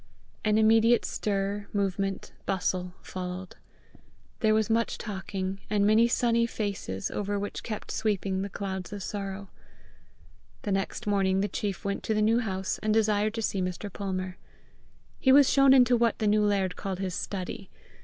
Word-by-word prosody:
An 215 0 +3
immediate 225 +2 +5
stir, 200 0 -2
movement, 195 -1 -1
bustle, 180 -1 -1
followed. 185 0 -6 0.8
There 215 -2 +3
was 220 -1 +2
much 230 +1 +1
talking, 195 -2 -4
and 205 -1 +2
many 220 +3 +5
sunny 235 -1 +2
faces, 200 - -3
over 205 0 -2
which 205 +1 -4
kept 215 -3 -5
sweeping 195 -3 -1
the 200 - -3
clouds 190 -1 -5
of 205 -2 -5
sorrow. 195 -1 -5 1.1
The 205 - -2
next 195 0 -2
morning 195 -2 +2
the 205 - +1
chief 205 -1 -4
went 200 0 -1
to 220 - 0
the 215 - +2
New 225 +2 +4
House, 190 -5 -2
and 215 - 0
desired 215 0 +2
to 225 - -2
see 195 -2 0
Mr. 185 +2 -4
Palmer. 185 -2 -4 0.8
He 260 - +4
was 280 0 +7
shown 275 -1 +6
into 250 -2 +6
what 235 -1 +2
the 220 - -1
new 210 0 +3
laird 195 -3 +1
called 195 -2 -4
his 185 -1 -3
study. 190 +1 -5
205 Hz, 165 wpm, -28 LUFS, 190-220 Hz, 1.1 s, was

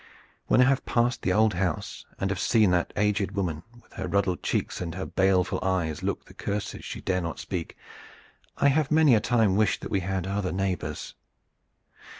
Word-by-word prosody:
When - - +5
I - - +8
have 130 +1 +2
passed 120 +1 +1
the 95 - 0
old 110 +2 +3
house 90 -3 -3
and 95 0 0
have 95 - -2
seen 110 -5 +3
that 90 -1 +1
aged 105 -1 +1
woman 90 -6 -2 0.2
with - - -24
her 95 -2 -4
ruddled 95 -1 0
cheeks - - -2
and 85 -2 -4
her 95 - -4
baleful 95 -1 +1
eyes 90 -5 -1
look - - -3
the - - -16
curses 100 0 -4
she - - -6
dare 90 -1 0
not 85 -1 -4
speak, 90 -4 -5 0.8
I 140 - +4
have 145 0 +1
many 155 -3 +5
a 110 - +5
time 110 -4 +2
wished 105 -1 +2
that - - -7
we 100 - +2
had 95 0 -2
other 100 -1 -2
neighbors." 95 -1 -3
95 Hz, 190 wpm, -27 LUFS, 90-110 Hz, 0.8 s, I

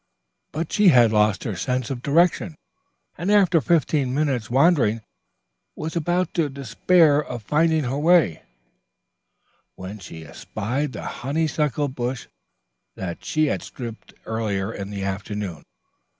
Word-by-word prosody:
But 160 +3 -4
she 210 -1 +4
had 120 -8 +6
lost 105 -2 +2
her 105 - -3
sense 125 +5 -2
of 125 -3 -4
direction, 165 +3 +2 0.6
and 180 +5 0
after 190 -6 +4
fifteen 150 -5 +1
minutes' 135 -7 0
wandering 130 -5 +3 0.7
was 160 +2 -5
about 175 +2 0
to 160 -4 +1
despair 145 +4 +3
of 120 -5 -7
finding 155 +5 +2
her 135 +2 -2
way, 160 - +3 1.3
when 95 +3 -8
she 80 -4 -10
espied 130 - -4
the - - -7 0.2
honeysuckle 150 +1 0
bush 125 -1 -4 0.7
that 85 -3 -6
she 155 0 +1
had 145 - -1
stripped 115 -3 -9
earlier 110 -2 -2
in 100 0 -6
the 100 -1 -5
afternoon. 100 -2 -4
135 Hz, 130 wpm, -23 LUFS, 110-155 Hz, 1.3 s, had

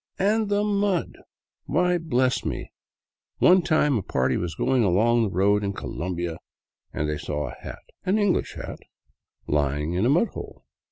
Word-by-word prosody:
" - - -56
And 210 +2 +1
the 205 0 +2
mud! 200 -3 0 0.5
Why, 180 +4 +2
bless 130 -6 +1
me, - - -4 0.7
one 185 +1 +6
time 150 -6 +2
a - - -3
party 65 -6 0
was 85 -2 -3
going 130 +3 +2
along 110 +5 +3
the 110 - +1
road 100 +3 +2
in 100 0 -1
Colombia 85 -3 -4 0.5
and 75 - -2
they 75 -1 -2
saw 75 0 -3
a - - -10
hat, - - -9 0.2
an 190 +3 +1
English 205 -4 +1
hat, - - -7 0.7
lying 75 +2 0
in 95 +6 +1
a - - +2
mudhole. 175 +11 -1
120 Hz, 165 wpm, -25 LUFS, -, 0.7 s, one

